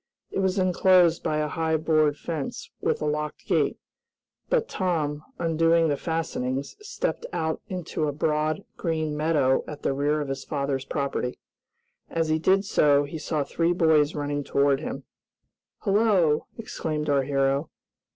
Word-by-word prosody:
It - - -2
was 190 0 +1
enclosed 185 -2 +4
by 155 - -1
a 155 0 0
high 160 +1 0
board 155 -1 +2
fence, 155 -5 -5
with - - 0
a - - 0
locked 150 0 -3
gate, - - +1 0.7
but 475 -2 +2
Tom, 155 - -1
undoing 165 0 +3
the 145 - +2
fastenings, 140 -4 -3
stepped 460 +3 -3
out 160 0 -2
into 170 -4 -3
a - - 0
broad, 155 +4 0
green 160 -3 -1
meadow 150 -4 +2
at 150 - -8
the - - +1
rear 145 +2 +1
of 145 -2 -3
his 135 0 -4
father's 140 -2 -2
property. 140 -3 -2 0.7
As 165 -1 -1
he 155 0 +2
did 190 +4 +3
so 145 -6 +4
he 145 +3 -6
saw 150 0 -1
three 165 +4 0
boys 160 -3 +3
running 145 0 -2
toward 140 0 +2
him. 135 - -5 0.8
"Hello!" 195 -7 +3
exclaimed 155 -9 -3
our 140 -2 +3
hero. 135 +2 0
155 Hz, 150 wpm, -26 LUFS, 145-165 Hz, 0.8 s, enclosed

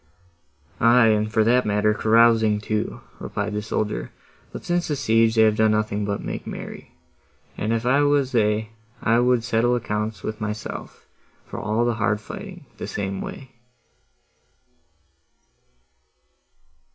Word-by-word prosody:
"Aye, 115 0 +5
and 110 0 +1
for 110 -1 +3
that 125 +3 +3
matter, 105 +1 +2
carousing 110 -1 +4
too," 110 0 -3 0.2
replied 105 +1 -4
the 105 - -2
soldier, 105 0 -3 0.4
"but, - - -8
since 175 0 0
the 150 - -1
siege, 115 -4 +2
they 110 - +6
have 110 -1 +4
done 110 0 +4
nothing 105 -1 0
but 100 0 -3
make - - -5
merry: - - -8 0.6
and 105 - -2
if 115 0 -1
I 135 +3 +3
was 145 -2 +2
they, 110 -2 +1 0.3
I 115 +1 +3
would 125 -1 +2
settle 120 +1 +2
accounts 105 -4 -3
with 110 0 -5
myself, 105 0 -6 0.4
for - - -7
all 110 +2 0
my 120 - +1
hard 105 -2 0
fighting, - - -9
the - - -5
same 95 -1 -4
way." 130 -1 -8
110 Hz, 140 wpm, -23 LUFS, 105-120 Hz, 0.6 s, they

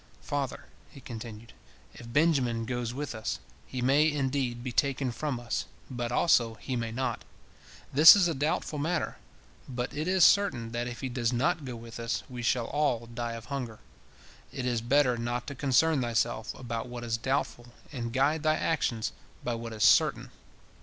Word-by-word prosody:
Father," 140 -3 -3 0.2
he - - -13
continued, 115 -2 -9 0.4
"if 115 0 -11
Benjamin 130 -6 +2
goes 120 -1 -2
with 145 +2 -4
us, 110 -1 -3 0.3
he 125 -2 -4
may, 145 +4 +4
indeed, 135 -4 -1
be 125 - -3
taken 135 0 +1
from 135 0 -3
us, 120 -1 -3 0.3
but 120 -1 -3
also 120 -4 +3
he 130 +3 -5
may 115 -2 -2
not. 130 +3 -2 0.7
This 155 +7 +11
is 190 -4 +4
a 165 - 0
doubtful 150 +1 -1
matter, 160 +2 -1 0.5
but 125 -1 -4
it 155 +3 -2
is 185 -2 +5
certain 130 - +3
that 120 +1 -2
if 120 -1 -7
he 135 - -2
does 120 -2 -1
not 150 +5 0
go 125 -2 -5
with 115 0 -9
us, 115 +1 -2
we 125 -2 -7
shall 120 0 +1
all 140 -6 0
die 115 0 -4
of 115 0 -8
hunger. 120 -6 -4 0.7
It 125 - -4
is 120 -2 0
better 125 0 +3
not 120 +1 -2
to 140 - -5
concern 140 +2 +2
thyself 120 -1 0
about 120 -2 -5
what 120 -1 -7
is 115 -1 -1
doubtful, 125 0 -2 0.2
and 120 -5 -4
guide 140 +5 +2
thy 155 0 +3
actions 125 -9 0 0.3
by 120 - -1
what 115 0 -5
is 110 -1 -2
certain. - - +4
125 Hz, 180 wpm, -29 LUFS, 115-145 Hz, 0.7 s, This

